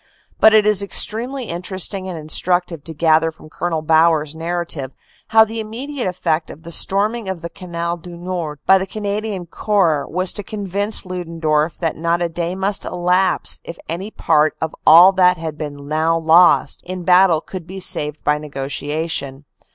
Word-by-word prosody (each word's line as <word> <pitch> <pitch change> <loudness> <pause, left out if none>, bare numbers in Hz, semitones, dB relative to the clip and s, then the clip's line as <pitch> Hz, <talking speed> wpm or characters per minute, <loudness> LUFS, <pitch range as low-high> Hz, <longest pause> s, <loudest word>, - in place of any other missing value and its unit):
But 220 0 +6
it 215 -1 +5
is 210 -2 +3
extremely 235 +6 0
interesting 190 0 -3
and 175 - -5
instructive 170 +1 -1
to 165 - -6
gather 160 +1 +3
from 155 0 -17
Col. 165 -2 -3
Bauer 160 0 +4
s 150 -1 -7
narra 170 +2 -3
tive 135 -5 -5 0.3
how 220 0 +6
the 225 +1 -6
immediate 245 +4 -4
effect 170 -3 -1
of 160 - -12
the 170 - -9
storming 205 +5 +1
of 180 -3 -5
the 170 - -6
Canal 170 -2 -4
du 175 +1 -11
Nord 175 -4 -4
by 190 0 +6
the 190 - -4
Canadian 205 -1 -4
Corps 170 -5 0
was 185 +1 -1
to 205 - -3
convince 205 +1 -3
Ludendorff 165 -3 -1
that 165 -3 -2
not 170 +2 0
a 175 -1 -1
day 170 +2 -3
must 195 +1 -1
elapse 180 +2 +1
if 170 - -9
any 180 +5 -4
part 155 -6 +1
of 160 -1 -3
all 175 +4 +9
that 180 -1 +3
had 160 -2 -5
been 145 -2 -7
now 160 +2 +1
lost 160 -3 +4
in 185 0 -6
battle 180 -2 +5
could 175 +1 -9
be 190 +1 -8
saved 150 -4 0
by 150 0 +1
negotiation. 145 0 -4
175 Hz, 175 wpm, -19 LUFS, 160-190 Hz, 0.3 s, all